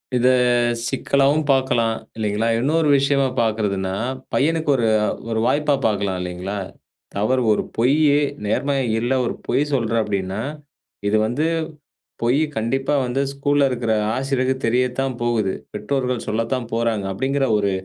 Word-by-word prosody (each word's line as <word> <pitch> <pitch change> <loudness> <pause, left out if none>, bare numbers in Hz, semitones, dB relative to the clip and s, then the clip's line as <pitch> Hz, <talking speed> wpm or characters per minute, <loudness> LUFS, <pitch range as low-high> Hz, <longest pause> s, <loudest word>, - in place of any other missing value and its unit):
இத 125 0 +3 0.6
சிக்கலாவும் 140 +3 +2
பாக்கலாம், 125 -4 +2 0.2
இல்லைங்களா? 105 +1 0
இன்னொரு 155 +5 +1
விஷயமா 140 0 +2
பாக்குறதுன்னா, 105 -4 0 0.4
பையனுக்கு 160 +2 +1
ஒரு 120 -3 +1 0.4
ஒரு 110 -1 0
வாய்ப்பா 150 +3 +2
பாக்கலாம் 100 -3 0
இல்லைங்களா? 90 +3 -4 0.6
அவர் 130 +4 +2
ஒரு 105 - +1
பொய்யி 140 +5 +4 0.3
நேர்மை 140 +7 0 0.2
இல்ல 120 +3 0
ஒரு - - -1
பொய் - - +2
சொல்ற 115 -4 0
அப்படின்னா 100 -1 -3 0.7
இது 105 +1 +3
வந்து 125 +8 -1 0.8
பொய் 120 +4 +2 0.2
கண்டிப்பா 135 +6 -1
வந்து 125 +2 -1
ஸ்கூல்ல 140 0 +2
இருக்கிற 120 -3 -1 0.2
ஆசிரியருக்கு 130 -1 0
தெரியத்தான் 125 +2 0
போகுது. 115 -5 0 0.2
பெற்றோர்கள் 125 +3 -2
சொல்லத்தான் 115 +3 -1
போறாங்க, 115 -3 0
அப்படிங்கிற 135 +7 0
ஒரு 100 -1 +1
120 Hz, 125 wpm, -21 LUFS, 110-135 Hz, 0.8 s, பொய்யி